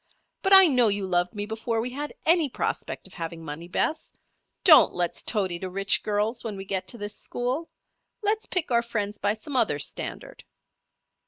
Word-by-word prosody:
"But 385 - 0
I 385 -1 +10
know 250 -7 +3
you 200 -1 0
loved 180 0 0
me 205 0 -3
before 225 +1 -3
we 245 +3 -3
had 290 +3 -6
any 330 -3 +4
prospect - - -4
of 190 - -9
having 165 -1 -6
money, 160 +3 -7
Bess. 310 - -1 0.5
Don't 320 -5 +7
let's 175 -1 -1
toady 190 -6 -1
to 185 - -5
rich 195 +2 +2
girls 215 +3 -1
when 215 -4 -5
we 195 - -7
get 190 -1 -3
to 240 - -1
this 205 -1 -5
school. 255 +7 -3 0.5
Let's 425 +1 0
pick 345 -7 -2
our 235 -1 +4
friends 210 -3 -4
by 205 - +1
some 245 +6 -8
other 220 - +2
standard." 145 - -6
215 Hz, 185 wpm, -26 LUFS, 190-255 Hz, 0.5 s, I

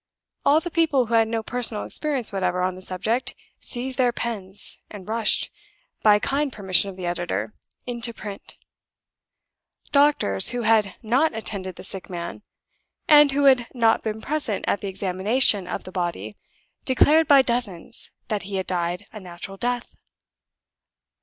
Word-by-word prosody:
All 290 +2 +5
the 345 +2 -6
people 310 -6 +2
who 235 - -5
had 225 -1 +4
no 225 0 -2
personal 235 -3 -2
experience 275 -8 -2
whatever 185 -2 0
on 185 0 0
the 185 - -11
subject 220 +7 -2 0.2
seized 255 +1 -3
their 250 -1 +4
pens, 205 -5 -2
and 205 -3 -10
rushed 220 0 +1 0.5
(by 210 -1 +6
kind 275 +6 -1
permission 195 -2 +2
of 190 - -10
the 185 - -5
editor) 145 - -3 0.3
into 235 -1 -3
print. 205 -3 -7 1.4
Doctors 280 - +4
who 245 -1 -1
had 215 -4 +2
not 250 +5 +2
attended 195 -5 -4
the 180 - -10
sick 190 0 -6
man, 170 +1 -6 0.7
and 295 -2 +7
who 285 +1 +1
had 260 -4 +5
not 230 -2 +3
been 220 0 -4
present 275 -8 -2
at 200 - 0
the 200 - -4
examination 195 +2 +2
of - - -4
the 185 - -10
body, 170 - -4 0.5
declared 300 +4 +4
by 280 -2 +7
dozens 235 -4 -2 0.2
that 210 -3 -2
he 195 +2 -6
had 190 -1 -2
died 175 -1 -2
a 215 - -7
natural 185 +1 -9
death. 245 +2 -3
220 Hz, 155 wpm, -23 LUFS, 185-250 Hz, 1.4 s, and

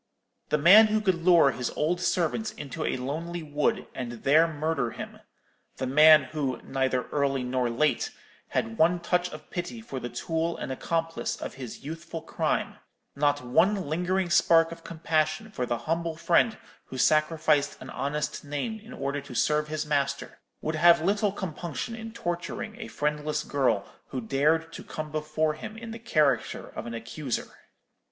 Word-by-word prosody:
The - - +3
man 195 +9 +8
who 215 0 +1
could 190 -5 0
lure 170 -6 +6
his 125 -2 -3
old 175 +4 0
servant 180 +5 0
into 150 +2 -5
a - - 0
lonely 160 +6 -4
wood 145 0 0
and 125 -2 -4
there 155 +4 +5
murder 155 -5 -1
him—the 130 - -10
man 150 +3 +7
who, 135 -2 -3
neither 130 -1 0
early 140 -2 0
nor 125 -1 0
late, 145 +6 +1 0.4
had 115 0 -2
one 175 +2 +4
touch 180 +1 0
of 155 -2 -11
pity 180 +6 -4
for 140 - -6
the 120 - -5
tool 165 +7 -2
and - - -5
accomplice 165 +4 -2
of - - -6
his 125 -4 -8
youthful 165 +2 -6
crime—not 145 -1 -2
one 185 +12 +4
lingering 180 +3 0
spark 165 -1 +5
of 170 - -9
compassion 160 +5 -1
for 125 -10 -3
the 120 - 0
humble 165 0 -1
friend 175 +7 +3 0.3
who 130 - -8
sacrificed 155 0 +2
an 130 - -9
honest 150 +2 -3
name 145 +10 -3
in 225 +4 -12
order 140 - -3
to 130 - -10
serve 150 +4 +2
his 155 0 -3
master—would 140 +2 -3
have 170 +1 +6
little 205 +2 +2
compunction 175 - -5
in 225 0 -7
torturing 175 +2 -4
a 220 - -5
friendless 150 -5 -1
girl 125 -8 +1 0.2
who 130 - -4
dared 155 +7 +1
to - - -8
come 155 -1 -6
before 155 0 0
him 215 +7 -8
in 230 0 -7
the 230 - -7
character 150 - +1
of - - -7
an 115 - -5
accuser.' 120 +3 -4
155 Hz, 160 wpm, -27 LUFS, 140-170 Hz, 0.4 s, man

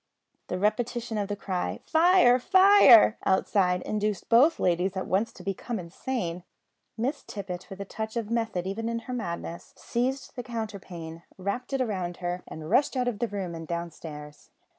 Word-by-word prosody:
The 180 - -2
repetition 225 +2 -1
of 200 - -1
the 205 - -3
cry, 185 -3 -3
"Fire! 325 -6 +5
fire!" 375 - +7
outside, 185 -1 +2
induced 210 -2 -2
both 270 +8 +5
ladies 180 +2 +1
at 190 - -2
once 200 +5 0
to - - -12
become 200 +4 -3
insane. 180 0 -4 0.5
Miss 270 +5 -1
Tippet, 185 -3 -7
with 195 - -9
a 200 - -4
touch 220 +3 -5
of 225 -1 -3
method 225 -6 -1
even 225 +4 -3
in 230 - -1
her 255 - -5
madness, 170 -6 -5
seized 255 +3 -2
the 245 - -4
counterpane, 190 -8 -6 0.2
wrapped 200 +8 -3
it 265 -2 +1
round 185 -5 -3
her, 180 0 -3
and 155 -1 -8
rushed 260 - +2
out 250 -1 +1
of 225 -5 -2
the 235 - 0
room 195 -5 -4
and 165 -1 -7
downstairs. 155 -3 -7
205 Hz, 170 wpm, -27 LUFS, 180-240 Hz, 0.5 s, fire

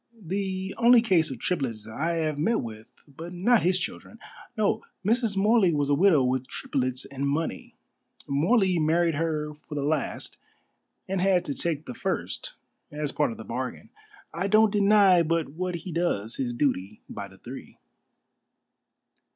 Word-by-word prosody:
"The 190 0 -3
only 240 0 +7
case 180 -8 +3
of 130 - -5
triplets 115 - -2
I 155 +10 -2
have 155 -3 -1
met 225 +9 +1
with, 110 -1 -8 0.2
but 160 +5 -9
not 210 +6 +3
his 180 +1 +2
children. 225 - -6 0.4
No, 215 +1 +1 0.2
Mrs. 225 -2 +1
Morley 205 -2 +4
was 145 -1 0
a - - +5
widow 160 -2 +5
with 130 0 0
triplets 130 -1 -2
and 140 0 -3
money. 155 +4 -3 0.5
Morley 180 - +2
married 165 +2 +2
her 150 -1 -2
for 150 0 -11
the 145 - -1
last, 150 0 -2 0.7
and 190 -1 -1
had 185 -2 +3
to 145 - -2
take 160 0 -2
the 125 - -6
first - - -4 0.4
as 150 -1 -3
part 150 - +1
of 115 - -7
the 110 - -8
bargain. 125 +3 -5 0.4
I 175 +4 -1
don't 215 +1 +5
deny 200 -3 +5
but 165 -1 0
what 180 +4 -3
he 170 +2 -6
does 150 - -1
his 120 -3 -2
duty 105 -7 -1
by 100 - -7
the 95 -1 -17
three." 125 +7 -10
160 Hz, 160 wpm, -26 LUFS, 140-190 Hz, 0.7 s, only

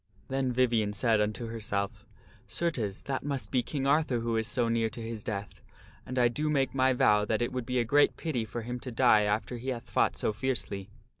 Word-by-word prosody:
Then 135 -1 0
Vivien 115 -4 +2
said 110 0 +2
unto 105 +3 -1
herself, 105 -3 -3 0.2
" - - -25
Certes, 120 - -2
that 135 -1 -3
must 140 -3 -3
be 125 - +3
King 135 +1 -3
Arthur 140 -4 +2
who 115 0 -1
is 110 0 0
so 120 -2 0
near 115 -1 +1
to 115 - -10
his 115 -2 -5
death, 100 -1 -5 0.5
and 130 - -5
I 120 -1 +5
do 150 +6 -1
make 140 -3 +1
my 130 0 +3
vow 105 -4 +4
that 110 +1 0
it 120 - -2
would 125 -2 -3
be 125 0 0
a 120 - +1
great 145 +5 +4
pity 145 -9 -2
for 115 +1 -5
him 125 +2 -4
to 125 - -6
die 115 -3 +5
after 105 +3 -1
he 125 +3 -5
hath 120 -2 -4
fought - - +2
so 110 - 0
fiercely." 105 -5 -3
120 Hz, 225 wpm, -29 LUFS, 110-130 Hz, 0.5 s, I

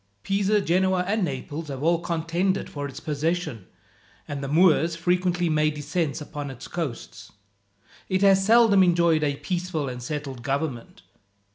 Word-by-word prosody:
Pisa, 200 +1 +1
Genoa, 185 +1 +2
and 210 +1 0
Naples 145 +1 -4
have 140 -1 -6
all 170 +1 +3
contended 170 +3 -1
for 145 -1 -4
its 135 0 -9
possession; 155 - -2 0.6
and 140 -1 -5
the - - -3
Moors 165 +1 +3
frequently 180 +1 0
make 155 -1 +1
descents 150 +1 -2
upon 145 -1 -6
its 130 -2 -9
coasts. 160 -9 -6 0.8
It 190 +1 +1
has 195 -1 +5
seldom 220 -2 +5
enjoyed 170 -3 +3
a 145 -1 0
peaceful 175 -2 -3
and 125 -1 -6
settled 135 -1 -5
government. 135 -1 -4
165 Hz, 145 wpm, -25 LUFS, 145-180 Hz, 0.8 s, has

